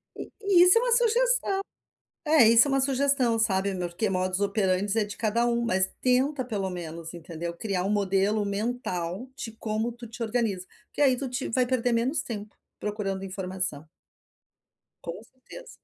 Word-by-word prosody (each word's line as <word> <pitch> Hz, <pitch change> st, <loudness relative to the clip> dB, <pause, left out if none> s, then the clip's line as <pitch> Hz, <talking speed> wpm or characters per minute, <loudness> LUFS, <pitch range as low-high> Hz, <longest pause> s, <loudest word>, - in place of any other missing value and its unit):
E -, -, -8 dB, 0.2 s
e 355 Hz, -3 st, +7 dB
isso 365 Hz, +5 st, +7 dB
é -, -, +4 dB
uma -, -, 0 dB
sugestão. 485 Hz, -2 st, +3 dB, 0.7 s
É, 300 Hz, -6 st, +6 dB
isso 230 Hz, +4 st, +7 dB
é -, -, -2 dB
uma 270 Hz, -, +2 dB
sugestão, 265 Hz, -3 st, +2 dB
sabe, 195 Hz, -2 st, +1 dB
porque 180 Hz, +3 st, -2 dB
modus 185 Hz, 0 st, -1 dB
operandi 200 Hz, 0 st, 0 dB
é 220 Hz, -, +3 dB
de 205 Hz, 0 st, -8 dB
cada 230 Hz, +2 st, +1 dB
um, 235 Hz, 0 st, +1 dB
mas 190 Hz, -3 st, +2 dB
tenta 260 Hz, +2 st, +1 dB
pelo 205 Hz, -5 st, -3 dB
menos, 170 Hz, -2 st, -7 dB
entendeu, 170 Hz, 0 st, -6 dB
criar 195 Hz, -2 st, -2 dB
um 195 Hz, -, -1 dB
modelo 205 Hz, +1 st, +1 dB
mental 200 Hz, -1 st, -3 dB
de 225 Hz, -, -6 dB
como 220 Hz, +1 st, -2 dB
tu 235 Hz, 0 st, -10 dB
te 235 Hz, +1 st, -6 dB
organiza, 220 Hz, -5 st, -1 dB, 0.2 s
porque -, -, -5 dB
aí 265 Hz, -3 st, +4 dB
tu 265 Hz, 0 st, -4 dB
te 250 Hz, +2 st, -3 dB
vai 250 Hz, +2 st, +2 dB
perder 245 Hz, -1 st, 0 dB
menos 250 Hz, +6 st, +1 dB
tempo 210 Hz, -2 st, -7 dB, 0.2 s
procurando 195 Hz, -2 st, -3 dB
informação. 185 Hz, -5 st, -4 dB, 1.2 s
Com 170 Hz, +4 st, -6 dB
certeza. 260 Hz, -, -14 dB
220 Hz, 170 wpm, -27 LUFS, 190-255 Hz, 1.2 s, e